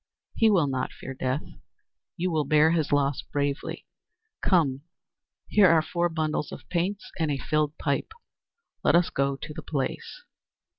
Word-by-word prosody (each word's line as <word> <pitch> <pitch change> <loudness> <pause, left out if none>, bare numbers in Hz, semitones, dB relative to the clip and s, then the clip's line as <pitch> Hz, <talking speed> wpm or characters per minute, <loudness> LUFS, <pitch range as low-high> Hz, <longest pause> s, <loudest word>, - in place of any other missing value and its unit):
He 225 - +4
will 185 -7 +4
not 130 -2 -2
fear 130 - -8
death; 130 +2 -2 0.7
you 180 +1 -1
will 155 -2 +1
bear 155 +3 +4
his 160 -3 0
loss 140 -1 +2
bravely. 140 -1 -3 0.6
Come, 145 -8 +2 0.7
here 205 -3 +6
are 160 -1 +5
four 175 +1 0
bundles 155 -2 -2
of - - -10
paints 185 +4 -2
and 160 -2 +1
a 140 - 0
filled 150 +1 0
pipe, 140 - -1 0.7
let - - +4
us 175 0 +3
go 140 0 0
to 150 +3 -8
the - - -7
place!" 155 - -4
155 Hz, 155 wpm, -27 LUFS, 140-170 Hz, 0.7 s, here